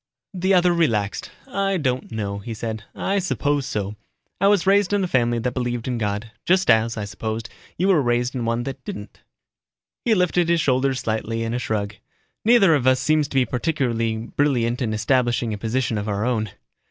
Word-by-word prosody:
The 190 +1 +2
other 180 -1 +4
relaxed. 110 -12 0 0.2
"I 195 0 0
don't 130 -6 -2
know," 100 -2 -3
he 115 +3 -6
said. 110 -1 -5
"I 200 +1 0
suppose 145 -7 0
so. 105 0 -3 0.4
I 195 - +4
was 200 -3 +3
raised 200 0 +3
in 200 -1 +2
a - - 0
family 120 -6 +1
that 120 +2 -2
believed 120 -2 -2
in 125 -2 -1
God. 105 +1 -2
Just 185 +1 +3
as, 115 +1 +2
I 105 - -3
suppose, 110 +3 -4 0.3
you 185 - +1
were 185 -6 +4
raised 120 0 0
in 125 -3 -3
one 115 +1 0
that 135 0 -6
didn't." 105 0 -8 0.8
He 230 -2 +3
lifted 180 -2 +2
his 170 -1 +3
shoulders 130 -2 +1
slightly 115 +1 -2
in 115 0 -2
a 125 - -1
shrug. 105 -3 -3 0.5
"Neither 215 -6 +6
of 135 -4 +1
us 130 0 +4
seems 155 +2 +2
to 140 - -10
be 130 -1 +4
particularly 120 -5 -1
brilliant 120 0 0
in 115 -3 0
establishing 120 0 +1
a - - -4
position 115 0 -1
of 105 - -4
our 100 +2 -1
own." 110 -4 0
125 Hz, 195 wpm, -22 LUFS, 110-160 Hz, 0.8 s, Neither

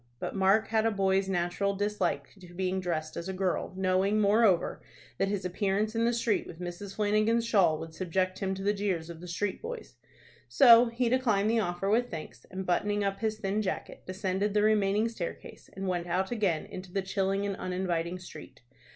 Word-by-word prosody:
But - - -5
Mark 195 +2 +3
had 220 0 +2
a - - +4
boy's 195 -2 +1
natural 185 +2 0
dislike 205 +1 -1
to 175 -2 -14
being 185 +1 -1
dressed 160 -4 -3
as 170 +3 -5
a - - -2
girl, 185 -1 -1
knowing, 190 +2 +2
moreover, 205 -3 +3 0.4
that 195 - +2
his 195 -2 -2
appearance 200 +3 0
in 230 0 +2
the 235 - +3
street 230 -3 0
with 165 - -10
Mrs. 180 +3 -6
Flanagan's 215 +2 +2
shawl 185 -9 +3
would 160 +1 -8
subject 185 +2 -1
him 190 -1 -1
to 195 - -6
the 205 +1 +2
jeers 185 -5 -2
of 165 -1 -11
the 180 - -8
street 190 +3 -2
boys. 470 0 -7 0.5
So 240 -3 +8
he 235 +1 -1
declined 225 -4 +2
the 230 - +2
offer 175 -1 -2
with 235 +4 +2
thanks, 160 -2 -8
and, 190 0 -5
buttoning 205 +3 +1
up 195 0 -1
his 220 -1 -1
thin 205 0 -1
jacket, 190 - -4
descended 190 +2 -1
the 210 - +4
remaining 210 0 +3
staircase, 210 -7 -7
and 195 0 -5
went 175 -1 -1
out 185 +4 -1
again 195 -9 0
into 185 -1 -9
the 195 +1 -1
chilling 195 +1 0
and 200 -1 -2
uninviting 180 -1 -2
street. 175 -8 -12
195 Hz, 195 wpm, -29 LUFS, 185-210 Hz, 0.5 s, So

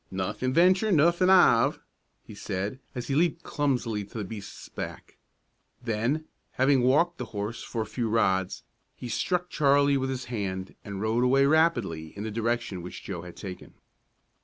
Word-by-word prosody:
"Nothing 105 +7 -2
venture, 185 +8 +4
nothing 170 +3 +4
'ave," 190 -2 +5 0.5
he - - -12
said, 100 +7 -4 0.2
as 125 -1 -4
he 135 - -2
leaped 170 +3 +1
clumsily 125 -8 -1
to 100 +3 -10
the 105 - -2
beast's 100 0 -8
back. - - -8 0.6
Then, 120 +6 -1 0.3
having 135 0 +3
walked 145 +8 +3
the 125 - -3
horse 105 +3 -3
for 115 -2 -3
a - - -8
few 115 +2 -3
rods, 95 -4 +1 0.3
he 125 - -7
struck 180 - -1
Charlie 140 -1 +3
with 130 0 -1
his 130 -1 -4
hand, 95 -5 -4
and 100 -2 -6
rode 110 +3 +1
away 135 +2 +4
rapidly 120 - +1
in 100 - -4
the 110 - -4
direction 115 -4 -2
which 90 - -9
Joe 90 -4 -5
had 90 0 -10
taken. 95 -3 -9
120 Hz, 165 wpm, -27 LUFS, 100-145 Hz, 0.6 s, ave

